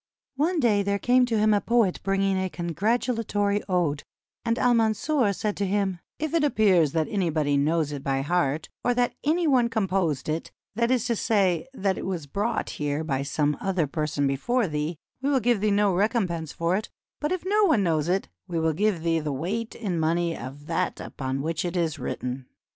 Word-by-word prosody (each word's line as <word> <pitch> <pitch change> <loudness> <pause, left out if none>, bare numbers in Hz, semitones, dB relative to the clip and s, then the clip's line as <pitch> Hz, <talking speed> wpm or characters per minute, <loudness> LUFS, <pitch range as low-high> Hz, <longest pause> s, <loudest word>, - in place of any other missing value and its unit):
One 325 +4 +1
day 220 -7 +3
there 200 0 0
came 250 +3 +3
to 230 -2 0
him 215 0 +4
a 205 - +2
poet 230 -6 +2
bringing 195 0 +1
a 190 0 -1
con 175 -1 -5
gratulatory 210 - 0
ode, 165 -6 +1 0.4
and 230 0 0
Al 245 0 +3
Mansur 230 +2 +2
said 205 +1 -2
to 200 - 0
him: 195 -2 0 0.2
"If 310 0 -3
it 335 - +3
aj> 295 -1 +1
pears 180 -9 +4
that 160 -2 +1
anybody 160 -7 0
knows 150 +1 +1
it 140 -2 -5
by 135 0 0
heart, 150 -1 0 0.2
or 245 0 +2
that 245 0 +1
any 330 +4 +2
one 255 -6 +3
composed 190 - 0
it, 155 +2 -2
— - - -57
that 235 +1 +1
is 255 -2 +2
to 235 - +1
say, 195 -5 +1
that 195 -4 0
it - - -5
was 175 -5 -3
brought 205 +11 -2
here 145 +1 -1
by 135 -4 -1
some 145 +1 0
other 185 -4 +1
person 150 -1 -1
before 200 - +1
thee, 150 +1 -3
— - - -53
we 275 - 0
will 275 -2 +3
give 235 -3 +1
thee 215 - +2
no 205 -1 +3
recompense 180 - 0
for 170 +2 0
it; 215 +3 -3 0.3
but 295 - -1
if 370 -1 -2
no 415 +2 +3
one 305 - +3
knows 160 -2 +1
it, 190 +2 0 0.2
we 170 - -2
will 160 0 +1
give 195 -1 0
thee 165 -1 +2
the 150 -1 -3
weight 195 +12 -3
in 190 -7 -2
money 165 +1 +1
of 135 +4 -8
that 165 +1 -1
upon 135 0 -4
which 160 0 -1
it 175 0 -2
is 160 -3 -1
written." 125 0 -4
190 Hz, 215 wpm, -26 LUFS, 160-225 Hz, 0.4 s, him